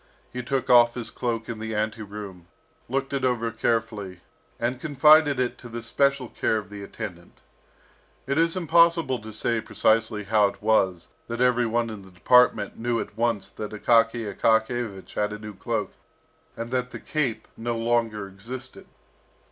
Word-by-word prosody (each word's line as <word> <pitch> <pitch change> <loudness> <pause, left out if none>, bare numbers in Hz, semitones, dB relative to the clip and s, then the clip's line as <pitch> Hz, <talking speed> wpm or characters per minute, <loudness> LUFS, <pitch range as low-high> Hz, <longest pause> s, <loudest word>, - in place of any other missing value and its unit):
He 125 - -3
took 130 +2 -2
off 120 -1 +6
his 115 -2 -5
cloak 115 -2 -3
in 115 -2 -5
the 110 0 -4
ante 110 +1 -2
room, 100 -4 -9 0.4
looked 135 +2 -2
it 135 -2 -1
over 120 -3 0
carefully, 105 -7 -2 0.4
and 125 +2 -2
confided 150 -1 +5
it 125 -1 -1
to 120 - -10
the 115 0 -6
special 140 +2 +1
care 110 - 0
of 105 -1 -7
the 100 -1 -8
attendant. 95 -4 -8 0.9
It 140 +3 0
is 165 +2 +2
impossible 170 -5 +3
to 110 0 -9
say 110 +2 -1
precisely 110 -1 +1
how 105 0 +3
it 100 - -8
was 95 -5 +1 0.2
that 120 0 -4
every 125 -1 +3
one 115 0 0
in 105 -2 -8
the 95 - -15
department 105 +3 +3
knew 120 0 0
at 105 - -6
once 115 -4 -1
that 105 0 -7
Akaky 115 +1 +2
Akakiyevich 110 -2 0
had 105 0 -1
a - - -5
new 105 0 -9
cloak, 95 - -3 0.6
and 115 +1 -5
that 125 -1 -1
the - - -8
"cape" 130 -8 -2
no 115 +1 -3
longer 115 -3 0
existed. 120 +7 -9
115 Hz, 170 wpm, -25 LUFS, 105-125 Hz, 0.9 s, off